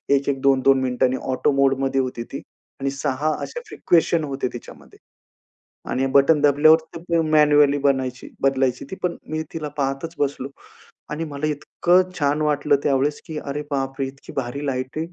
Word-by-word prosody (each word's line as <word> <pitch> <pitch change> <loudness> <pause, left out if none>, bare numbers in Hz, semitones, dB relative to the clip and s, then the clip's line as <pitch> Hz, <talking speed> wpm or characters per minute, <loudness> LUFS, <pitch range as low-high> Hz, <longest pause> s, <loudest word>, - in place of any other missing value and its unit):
एक-एक, 140 -1 -1
दोन 135 -1 +3
दोन 135 -1 +5
मिनिटांनी, 130 0 +1
ऑटो 140 +3 +1
मोडमध्ये 135 0 +2
होती 125 -2 -4
ती. 135 - -4 0.4
आणि 135 - 0
6 140 +2 -1
असे 485 - -6
फ्रिक्वेशन 170 - +1
होते 140 -3 -2
त्याच्यामध्ये. 120 - -12 0.9
आणि 130 +1 0
बटण 145 +2 +5
दाबल्यावर 150 +2 +6 0.2
ते 170 0 0
मॅन्युअली 150 -2 +5
बनायची 130 -2 -1
बदलायची 135 -2 +1
ती, 190 - -4
पण 180 - 0
मी 155 0 -2
तिला 155 -2 -4
पाहतच 135 +4 -2
बसलो. 140 -1 -2 0.6
आणि 155 +2 -3
मला 140 +2 -3
इतकं 175 +5 +1
छान 145 +2 +1
वाटलं 145 -1 +2
त्यावेळेस, 145 +1 +1
की 160 -2 -5
अरे 145 0 -4
बापरे, 135 0 -2
इतकी 135 +1 -11
भारी 135 +2 -3
लाइटिंग 130 +2 -3
140 Hz, 155 wpm, -22 LUFS, 135-150 Hz, 0.9 s, दाबल्यावर